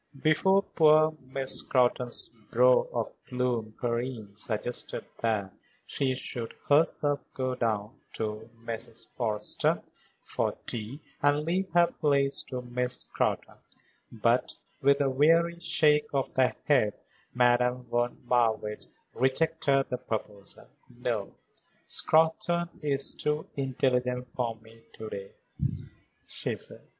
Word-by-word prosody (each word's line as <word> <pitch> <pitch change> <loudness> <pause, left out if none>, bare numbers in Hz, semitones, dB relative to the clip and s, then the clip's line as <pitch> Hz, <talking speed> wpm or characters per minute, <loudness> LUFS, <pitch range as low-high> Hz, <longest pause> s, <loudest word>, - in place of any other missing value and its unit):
Before 190 +7 +4
poor 155 -2 +4 0.2
Miss 135 -1 -2
Scrotton's 125 -1 +1 0.2
brow 125 +1 +5
of - - -2
gloom 120 -4 -1
Karen 120 -4 -3
suggested 110 +2 -4
that 105 -4 0 0.3
she 130 -2 0
should 120 -2 -5
herself 145 -1 +3 0.2
go 130 -1 -1
down 110 -4 -1 0.2
to 110 +1 -4
Mrs. 115 0 -7
Forrester 110 -4 +1 0.4
for - - -1
tea 115 +5 -5 0.2
and 145 +1 +3
leave 185 +3 0
her 175 0 +7
place 140 -4 +2
to 125 -1 -4
Miss 125 0 -1
Scrotton, - - -1 0.5
but, 115 +2 +1 0.3
with 140 +1 +4
a 140 - +3
weary 165 +5 +4
shake 150 -3 +3
of 135 -2 0
the 130 -1 +3
head, 125 -8 +3 0.4
Madame 125 0 +3
von 120 0 -1
Marwitz 110 -3 +1 0.2
rejected 135 +1 +2
the 125 - 0
proposal. 105 -4 -5 0.2
"No; 120 -4 -3 0.5
Scrotton 165 +2 +2
is 140 -2 0
too 150 +1 -1
intelligent 125 -2 0
for 120 -2 -2
me 110 +1 -18
to 110 0 -7
day," 100 0 -6 0.9
she - - -3
said. - - -6
125 Hz, 115 wpm, -29 LUFS, 115-145 Hz, 0.9 s, her